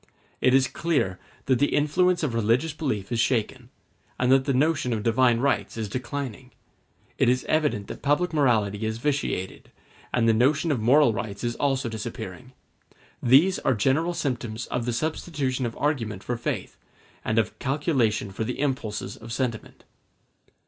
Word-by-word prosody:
It 130 0 +4
is 135 -1 +4
clear 140 - -1 0.3
that 130 -2 +2
the 145 - +2
influence 175 +4 +2
of 140 -6 0
religious 115 +7 +1
belief 130 -11 -3
is 120 - 0
shaken, 120 -2 0 0.5
and 125 0 +2
that 135 0 +4
the 140 - +1
notion 140 -2 +1
of 110 -2 -2
divine 120 +1 +3
rights 140 -3 0
is 110 -2 -2
declining; 130 +2 -5 0.7
it - - +4
is 125 +1 +1
evident 150 -10 +1
that - - -8
public 150 +4 +1
morality 110 -8 +2
is 110 0 -2
vitiated, 135 -8 -2 0.4
and 115 -1 +2
the 115 - +5
notion 140 +8 +2
of 135 - 0
moral 130 +2 +5
rights 105 -2 -5
is 120 0 -1
also 135 -3 0
disappearing: 110 +1 -7 0.7
these 145 +10 +5
are 130 - +1
general 150 +11 +1
symptoms 120 -5 -3
of 120 -1 -1
the 120 - -1
substitution 140 -2 -2
of 115 - -8
argument 115 -10 -1
for 120 - -2
faith, 120 - -4 0.5
and 110 - -1
of 110 -1 0
calculation 130 - 0
for 100 - -3
the 125 +3 -4
impulses 130 -7 -2
of 115 0 -11
sentiment. 120 -2 -4
125 Hz, 160 wpm, -25 LUFS, 115-145 Hz, 0.7 s, the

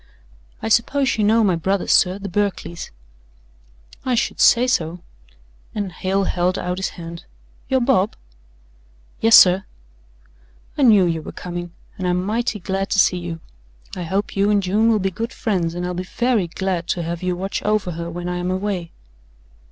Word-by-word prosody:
"I - - -1
suppose 265 +4 +2
you - - +3
know 220 +2 +4
my 190 -4 +3
brothers, 190 +3 -1
sir, 185 +1 +4
the 200 0 -6
Berkleys." 195 -3 -2 1.1
"I 255 -1 +1
should - - -1
say 245 +1 +6
so," 175 -8 -1 0.7
and 205 -3 -3
Hale 190 +4 -1
held 180 0 0
out 180 +1 -3
his 190 - -1
hand. 170 0 -8 0.4
"You're 260 -1 +2
Bob?" 230 -5 +2 1.0
"Yes, 225 0 +6
sir." 185 +1 +7 1.1
"I - - -2
knew 215 -8 +6
you 165 -2 -1
were - - -8
coming, 175 -1 -6 0.3
and 185 - -1
I'm 180 0 +1
mighty 225 +2 -1
glad 195 +2 -2
to - - 0
see 180 -1 +4
you. 170 -2 -6 0.5
I 180 - -5
hope 190 +4 -2
you 200 +1 +2
and 205 -1 +2
June 210 +5 +2
will 225 - +4
be 195 -1 -1
good 230 +6 -4
friends 180 -8 -1
and 175 0 -3
I'll 180 - -3
be 180 - -3
very 215 +2 0
glad 180 0 -3
to 175 - -1
have 170 +1 -4
you 180 -1 -1
watch 190 +2 -3
over 210 -3 0
her 170 0 -5
when 175 +1 -5
I'm 180 0 -2
away." 185 -2 -2
190 Hz, 175 wpm, -21 LUFS, 175-210 Hz, 1.1 s, sir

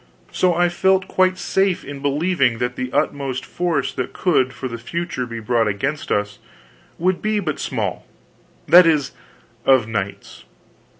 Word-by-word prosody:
So 180 -2 +2
I 175 +1 +3
felt 190 +2 +2
quite 185 0 +2
safe 190 -1 0
in 140 0 -8
believing 145 -3 +1
that 125 +1 -2
the 130 0 -4
utmost 135 -1 -1
force 175 -4 -1
that 130 - -4
could 135 -8 +1
for 130 +1 -6
the 115 -1 -6
future 130 -1 -4
be 115 -1 -6
brought 115 0 +1
against 135 +9 -2
us 105 0 -1 0.6
would 180 +2 0
be 215 0 0
but 155 -7 -3
small; - - -3 0.6
that 175 0 +8
is, 150 -4 +2 0.5
of 130 -5 +4
knights. 100 -3 -5
140 Hz, 155 wpm, -21 LUFS, 125-175 Hz, 0.6 s, that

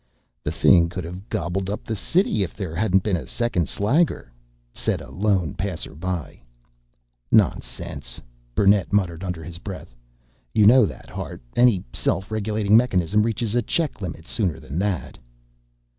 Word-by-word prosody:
"The - - -1
thing 85 -3 +5
could 90 +1 -5
have 90 +5 -8
gobbled 90 +3 -2
up 105 - -4
the 110 - -3
city 165 - +1
if 90 -4 -2
there 95 -6 -4
hadn't 95 +1 +2
been 105 -4 +1
a 85 - -5
second 120 - 0
slagger!" 115 - +1 0.4
said - - -1
a - - -11
lone 95 -6 +1
passerby. 90 -4 -4 0.9
"Nonsense," - - 0 0.4
Burnett 100 -2 +4
muttered 90 -4 +1
under 90 -3 -4
his 85 +1 -8
breath. 95 -10 -8 0.6
"You 105 - +5
know 120 0 +7
that, - - -10
Hart. - - -6
Any 120 -7 +4
self 95 +4 -1
regulating 105 -1 +1
mechanism 105 -4 +3
reaches 115 0 -1
a 120 - +3
check 150 +1 -1
limit 80 -3 -6
sooner 90 - -1
than 70 +6 -5
that." 95 -8 -2
95 Hz, 150 wpm, -23 LUFS, 85-110 Hz, 0.9 s, know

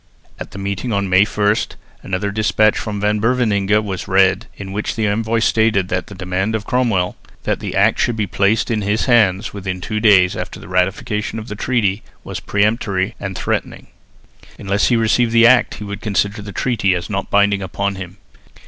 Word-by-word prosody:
At - - -7
the - - -11
meeting 100 +4 -3
on 100 -2 -1
May 95 +2 +6
1 105 0 +1 0.5
another 95 +2 -2
despatch 110 0 +2
from 105 -2 -4
Van 105 +1 +1
Beverningh 105 -3 +2
was 95 -4 -5
read 95 0 +3
in 95 -1 -7
which 105 +2 -3
the 110 - 0
envoy 110 +2 0
stated 110 -4 +2
that 95 0 -2
the 100 - -10
demand 95 +3 -2
of 110 -1 -4
Cromwell 110 -8 0 0.3
that - - -1
the - - -5
Act - - +3
should 120 - +1
be 110 -2 -1
placed 100 +5 +1
in 110 -2 0
his 105 +2 0
hands 110 -5 +2
within 95 -2 -4
two 110 +4 -3
days 100 -5 +4
after - - -6
the - - -12
ratification 100 +5 -1
of 110 +2 -7
the 105 - -5
treaty 105 -3 0 0.2
was - - -6
peremptory 100 -1 0
and 95 -2 -5
threatening. - - -3 0.7
Unless 100 +1 0
he 125 - +3
received 115 +1 +2
the 115 0 +6
Act 120 +1 +4
he - - -8
would 100 +1 -6
consider 105 0 -1
the 100 0 -8
treaty 100 -5 0
as 90 - -4
not 100 -2 -3
binding 100 0 +3
upon 100 +2 -2
him. 95 0 -8
105 Hz, 195 wpm, -18 LUFS, 95-110 Hz, 0.7 s, May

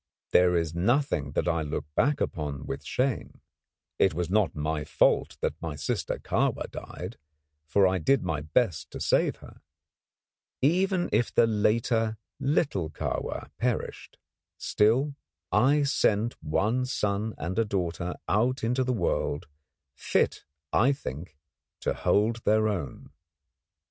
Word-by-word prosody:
There 90 -1 +5
is 80 -1 -1
nothing 90 - +1
that - - 0
I 85 -2 +1
look 75 -1 -3
back 145 - +2
upon 75 -3 -3
with 70 +2 -5
shame. 130 - -2 0.6
It 95 -5 +3
was 90 +1 -2
not 105 -5 +2
my 75 0 -1
fault 75 - +2
that 80 - -2
my 80 -3 -4
sister 70 - -2
Kahwa - - -1
died; - - -7 0.5
for 100 +5 +4
I 95 0 +2
did 135 - +2
my 75 -2 -2
best 80 +3 0
to - - -6
save - - +2
her. - - -15 1.0
Even 180 +5 +2
if 120 - +2
the - - +5
later 110 +1 +1 0.2
little 135 - 0
Kahwa - - -4
perished, - - -2 0.4
still, 125 +8 +2 0.4
I 140 +7 +4
sent 115 -5 +2
one 105 +11 0
son 105 -2 -1
and 90 +6 -2
a - - +4
daughter 90 -4 -2
out 120 +6 +1
into 125 +3 +1
the 130 0 0
world, 85 -5 -1 0.5
fit - - 0 0.3
I 130 +5 +4
think, 75 - -7 0.4
to - - 0
hold 110 +3 +2
their 110 +1 +3
own. 90 -10 -4
105 Hz, 135 wpm, -28 LUFS, 80-125 Hz, 1.0 s, There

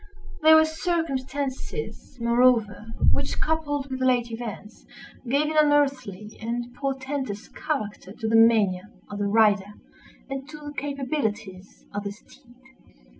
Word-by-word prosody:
There 315 +1 +8
were 315 0 +7
circumstances, 315 +1 -3
moreover, 235 -3 +3 0.2
which - - -1
coupled 290 -3 -1
with 260 0 -3
late 245 -2 +2
events, 225 -2 -7 0.5
gave 280 +4 +3
an - - -4
unearthly 275 -9 +1
and 240 +2 -3
portentous 265 -4 -3
character 215 -11 -4
to 220 +2 -5
the 225 - +2
mania 210 -4 +4 0.2
of 205 - -5
the 205 - 0
rider, 205 -1 +3 0.5
and 270 0 -6
to 305 - -8
the 295 -1 -8
capabilities 250 -10 -4
of 205 0 -3
the 200 - -4
steed. 240 +4 -20
250 Hz, 125 wpm, -25 LUFS, 210-285 Hz, 0.5 s, There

